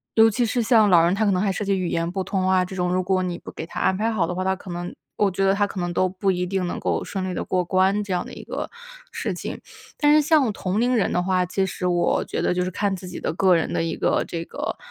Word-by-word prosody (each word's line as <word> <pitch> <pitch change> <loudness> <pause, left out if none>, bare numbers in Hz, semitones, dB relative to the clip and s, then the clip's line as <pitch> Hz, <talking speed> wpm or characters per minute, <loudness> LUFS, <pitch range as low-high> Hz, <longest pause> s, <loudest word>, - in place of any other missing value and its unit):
尤 225 0 +7
其 240 +3 0
是 235 +2 0
像 220 -3 +5
老 170 -3 +6
人， 170 +2 +3
他 220 +2 +1
可 205 - +3
能 185 -1 +1
还 200 -1 +1
涉 205 +2 -3
及 195 -1 +1
语 180 -2 -1
言 165 0 -1
不 190 +1 -2
通 185 -1 -1
啊， 185 -1 +4
这 190 - -8
种， 180 -1 0
如 185 0 +1
果 185 0 +1
你 175 -1 -3
不 - - -10
给 - - -6
他 - - -7
安 190 0 +2
排 225 +3 0
好 200 -6 +1
的 180 - -3
话， 185 - -2
他 190 0 +1
可 185 - -12
能 175 0 -5 0.2
我 205 - +3
觉 190 +2 -1
得 195 - +4
他 205 +1 +1
可 195 - -6
能 175 0 -2
都 185 +2 +2
不 190 +1 0
一 180 -1 -1
定 185 0 -1
能 - - -4
够 - - -1
顺 190 -1 -4
利 - - -3
地 - - -3
过 180 -1 0
关 190 +3 +2
这 200 -2 -3
样 180 - -1
的 - - -10
一 - - -8
个 - - -4 0.4
事 - - -3
情。 - - -6 0.4
但 295 -1 +4
是 305 - +6
像 290 -7 +3
同 190 +1 -2
龄 250 +1 +2
人 220 - +1
的 180 - +2
话， 185 -1 +1
其 190 +2 0
实 180 -1 -4
我 175 -1 +1
觉 - - -3
得 - - +1
就 180 0 0
是 185 - -3
看 200 +1 -1
自 185 0 -9
己 - - -7
的 - - -2
个 185 +1 +4
人 165 - -2
的 - - 0
一 165 - -3
个 - - +1
这 165 0 -4
个 - - -5
185 Hz, 335 characters per minute, -23 LUFS, 180-205 Hz, 0.4 s, 尤